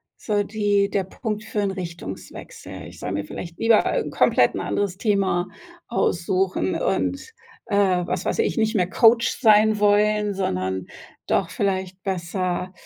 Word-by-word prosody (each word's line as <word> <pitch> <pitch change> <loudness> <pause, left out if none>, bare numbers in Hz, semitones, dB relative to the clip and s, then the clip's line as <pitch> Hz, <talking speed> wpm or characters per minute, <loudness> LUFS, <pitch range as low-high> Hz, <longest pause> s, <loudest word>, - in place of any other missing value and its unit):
so 205 -2 -1
die 205 -1 +1
der 200 -1 0
Punkt 210 +3 -5
für 210 - -4
'n 200 -1 0
Richtungswechsel. 170 - -8
Ich - - -13
soll - - -4
mir 100 +1 -2
vielleicht 170 -1 -8
lieber 225 -1 +3
komplett - - +3
'n - - -2
anderes 200 -2 -2
Thema 195 -4 +1 0.4
aussuchen 185 -3 0
und, 480 -2 -2 0.3
äh, 215 - -2 0.3
was 180 +1 -2
weiß - - -1
ich, - - +1
nicht 220 0 +1
mehr 180 -3 +1
Coach 230 +3 +5
sein 215 -2 +5
wollen, 210 0 +3
sondern 95 - -2 0.4
doch - - +1
vielleicht 190 -1 -2
besser 180 -1 -2
200 Hz, 145 wpm, -23 LUFS, 180-210 Hz, 0.4 s, Coach